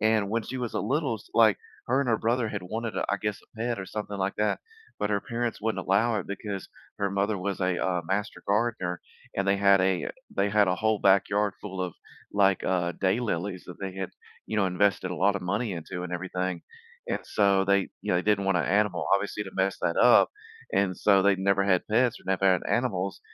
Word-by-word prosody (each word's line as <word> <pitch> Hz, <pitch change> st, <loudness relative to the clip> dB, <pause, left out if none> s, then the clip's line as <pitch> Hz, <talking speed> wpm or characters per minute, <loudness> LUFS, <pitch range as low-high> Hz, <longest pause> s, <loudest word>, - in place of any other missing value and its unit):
and 110 Hz, -2 st, +2 dB
when 115 Hz, 0 st, 0 dB
she 130 Hz, -, -5 dB
was 120 Hz, -3 st, -4 dB
a -, -, 0 dB
little 135 Hz, +2 st, 0 dB
s 100 Hz, -, -16 dB
like, 110 Hz, -4 st, +6 dB, 0.3 s
her 130 Hz, +3 st, +3 dB
and 140 Hz, -, -1 dB
her 115 Hz, -, +3 dB
brother 115 Hz, 0 st, +1 dB
had 100 Hz, -3 st, -4 dB
wanted 110 Hz, +4 st, -4 dB
a -, -, 0 dB
I 100 Hz, -, +2 dB
guess, 105 Hz, -1 st, -2 dB
a -, -, -16 dB
pet 120 Hz, -3 st, -1 dB
or 95 Hz, -, -6 dB
something 105 Hz, -1 st, -5 dB
like 95 Hz, 0 st, -2 dB
that, 105 Hz, 0 st, 0 dB, 0.4 s
but 105 Hz, -, 0 dB
her 100 Hz, -1 st, +1 dB
parents 120 Hz, -2 st, -3 dB
wouldn't 105 Hz, -4 st, -2 dB
allow 110 Hz, +5 st, +2 dB
it -, -, -9 dB
because 100 Hz, -1 st, -5 dB, 0.3 s
her 100 Hz, -1 st, 0 dB
mother 100 Hz, +1 st, 0 dB
was 100 Hz, +1 st, -3 dB
a, 90 Hz, -1 st, +1 dB
uh, 90 Hz, -2 st, 0 dB
master 100 Hz, +2 st, -2 dB
gardener, 100 Hz, -4 st, 0 dB, 0.4 s
and 100 Hz, 0 st, 0 dB
they 100 Hz, -, +4 dB
had 100 Hz, -1 st, +5 dB
a 95 Hz, -1 st, +1 dB, 0.3 s
they 100 Hz, +1 st, +2 dB
had 105 Hz, -1 st, +3 dB
a 90 Hz, -, +1 dB
whole 110 Hz, 0 st, +1 dB
backyard 100 Hz, +1 st, +3 dB
full 95 Hz, -2 st, -5 dB
of, 90 Hz, -3 st, -3 dB, 0.4 s
like, 100 Hz, -2 st, +3 dB
uh, 90 Hz, -2 st, 0 dB
daylilies 95 Hz, -2 st, -1 dB
that 90 Hz, 0 st, -10 dB
they 95 Hz, -1 st, -4 dB
had, 95 Hz, -1 st, -4 dB, 0.4 s
you 110 Hz, -, -3 dB
know, 100 Hz, -2 st, +3 dB
invested 95 Hz, 0 st, +1 dB
a 90 Hz, -, -4 dB
lot 100 Hz, +1 st, +3 dB
of 100 Hz, -, -3 dB
money 100 Hz, +4 st, -1 dB
into 90 Hz, +1 st, -5 dB
and 90 Hz, -, -6 dB
everything. 90 Hz, 0 st, -3 dB, 0.5 s
And -, -, -1 dB
so, 100 Hz, -2 st, +2 dB
they 100 Hz, 0 st, +2 dB
you -, -, -1 dB
know, 90 Hz, -, +3 dB
they 90 Hz, -, 0 dB
didn't 105 Hz, -2 st, +2 dB
want 95 Hz, -2 st, +2 dB
an -, -, 0 dB
animal, 105 Hz, +2 st, +1 dB
obviously, 100 Hz, +1 st, +1 dB
to 95 Hz, -, -8 dB
mess 95 Hz, 0 st, +1 dB
that 85 Hz, -1 st, 0 dB
up, -, -, +6 dB, 0.4 s
and 95 Hz, -2 st, +1 dB
so 100 Hz, -2 st, +4 dB
they'd 100 Hz, -1 st, +3 dB
never 100 Hz, 0 st, +2 dB
had 95 Hz, -2 st, +3 dB
pets 120 Hz, +2 st, +2 dB
or -, -, -21 dB
never 95 Hz, 0 st, 0 dB
had 95 Hz, -2 st, +4 dB
animals, 100 Hz, -6 st, -1 dB
100 Hz, 230 wpm, -27 LUFS, 95-105 Hz, 0.5 s, like